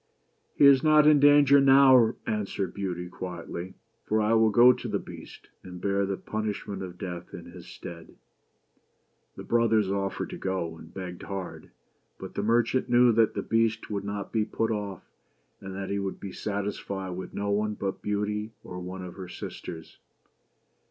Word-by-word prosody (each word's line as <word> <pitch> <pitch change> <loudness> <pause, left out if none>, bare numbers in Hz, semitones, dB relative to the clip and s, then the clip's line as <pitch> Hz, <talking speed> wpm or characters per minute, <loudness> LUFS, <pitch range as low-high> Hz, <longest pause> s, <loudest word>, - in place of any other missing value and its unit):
"He - - +5
is 140 -2 +7
not 155 -1 +6
in 150 -1 +6
danger 145 -1 +6
now," 135 -4 +6
answered 100 -3 -2
Beauty 90 -3 -4
quietly, 90 0 -7
" 115 0 -46
for 110 - +2
I 110 +1 +2
will 110 -1 +5
go 120 +4 +7
to 125 - -7
the - - -1
Beast - - -11
and 90 -1 -10
bear 100 +1 0
the 95 -1 -2
punishment 105 -2 -4
of 90 -2 -7
death 90 -2 -7
in 85 - -10
his 90 0 -12
stead. 85 -2 -10 1.2
The - - -8
brothers 110 -4 +2
offered 100 0 -2
to - - -7
go, 95 -4 -3
and - - -13
begged 90 -2 -7
hard; 95 -2 -7 0.5
but - - -8
the - - -2
merchant 120 +4 +1
knew 120 0 +5
that 115 -1 +2
the - - -2
Beast 115 -1 0
would 100 -1 -2
not 100 0 -5
be 110 -2 +1
put 115 +1 -2
off, 105 -3 -4 0.6
and 95 0 -8
that 95 0 -5
he 100 - -1
would 95 -1 -4
be 100 - -7
satisfied 100 -2 -4
with 90 +1 -7
no 100 0 -2
one 105 +1 0
but 95 -1 -4
Beauty, 105 +1 -2
or 90 - -8
one 90 +1 -7
of 90 -1 -8
her 95 -1 -7
sisters. 80 -1 -8
100 Hz, 180 wpm, -27 LUFS, 95-115 Hz, 1.2 s, is